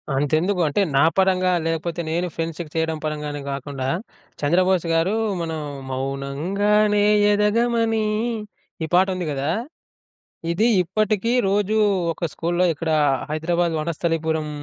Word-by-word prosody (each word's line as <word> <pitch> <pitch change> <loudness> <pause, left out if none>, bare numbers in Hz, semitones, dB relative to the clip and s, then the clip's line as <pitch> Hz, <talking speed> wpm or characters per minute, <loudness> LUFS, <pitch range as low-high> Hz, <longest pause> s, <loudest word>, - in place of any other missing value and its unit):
అంతెందుకు 155 +7 +1
అంటే 150 +8 +1
నా 135 - +5 0.2
పరంగా 185 -1 +3 0.2
లేకపోతే 165 +1 -2
నేను 175 +2 0
ఫ్రెండ్స్‌కి 165 -1 -4
చేయడం 160 -1 0
పరంగానే 150 -1 -3
కాకుండా 135 -1 -4 0.5
చంద్రబోస్ 180 +3 +2
గారు 170 +6 +2 0.3
మనం 160 -1 -3 0.3
మౌనంగానే 180 +11 +1 0.3
ఎదగమని 225 +1 +2 0.8
ఈ - - 0
పాట 185 +2 +5
ఉంది 180 -2 -3
గదా! 140 +3 -1 1.0
ఇది 215 +7 +2 0.2
ఇప్పటికీ 215 +4 0 0.2
రోజూ 205 +1 +1 0.4
ఒక 170 +1 -3
స్కూల్లో 175 +2 0
ఇక్కడ 160 +2 -3 0.4
హైదరాబాద్ 170 +2 0
వనస్థలిపురం, 160 -1 -1
170 Hz, 110 wpm, -22 LUFS, 155-195 Hz, 1.0 s, నా